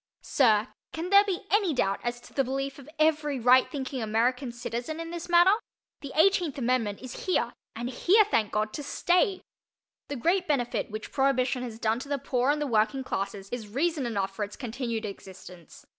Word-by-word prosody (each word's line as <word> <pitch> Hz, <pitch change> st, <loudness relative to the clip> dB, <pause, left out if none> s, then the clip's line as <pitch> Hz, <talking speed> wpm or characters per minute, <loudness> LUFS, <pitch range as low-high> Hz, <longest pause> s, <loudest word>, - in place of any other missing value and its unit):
Sir, 220 Hz, -4 st, +3 dB, 0.2 s
can 335 Hz, +3 st, -4 dB
there 400 Hz, 0 st, +8 dB
be 390 Hz, -2 st, -3 dB
any 395 Hz, -7 st, +2 dB
doubt 195 Hz, -5 st, +1 dB
as 240 Hz, 0 st, -2 dB
to -, -, -16 dB
the 270 Hz, -, +2 dB
belief 270 Hz, +2 st, -3 dB
of 280 Hz, +1 st, -13 dB
every 305 Hz, -3 st, +2 dB
right 250 Hz, +2 st, +5 dB
thinking 265 Hz, -3 st, -4 dB
American 240 Hz, +4 st, 0 dB
citizen 240 Hz, +5 st, -5 dB
in 330 Hz, 0 st, -5 dB
this 345 Hz, 0 st, -6 dB
matter? 345 Hz, +2 st, +6 dB, 0.5 s
The 280 Hz, -, -8 dB
Eighteenth 345 Hz, -3 st, +3 dB
Amendment 240 Hz, -5 st, -1 dB
is 255 Hz, +7 st, -8 dB
here 370 Hz, -, +1 dB, 0.2 s
and 235 Hz, +2 st, -4 dB
here, 370 Hz, -, +4 dB
thank 220 Hz, -, 0 dB
God, 215 Hz, 0 st, -1 dB
to -, -, -4 dB
stay! 360 Hz, +6 st, +1 dB, 0.6 s
The 285 Hz, -, -4 dB
great 350 Hz, +8 st, +1 dB
benefit 245 Hz, -7 st, 0 dB
which 215 Hz, 0 st, -7 dB
Prohibition 265 Hz, -2 st, +1 dB
has 235 Hz, -3 st, -6 dB
done 225 Hz, +1 st, 0 dB
to 275 Hz, -, -9 dB
the 285 Hz, -, 0 dB
poor 255 Hz, -1 st, 0 dB
and 295 Hz, +1 st, +2 dB
the 295 Hz, -, -1 dB
working 225 Hz, +1 st, +1 dB
classes 195 Hz, -3 st, -4 dB
is 240 Hz, -3 st, -5 dB
reason 285 Hz, +4 st, -1 dB
enough 195 Hz, -4 st, -2 dB
for 210 Hz, -, -2 dB
its 205 Hz, 0 st, -6 dB
continued 235 Hz, -3 st, -4 dB
existence. 190 Hz, -3 st, -11 dB
255 Hz, 190 wpm, -28 LUFS, 225-305 Hz, 0.6 s, there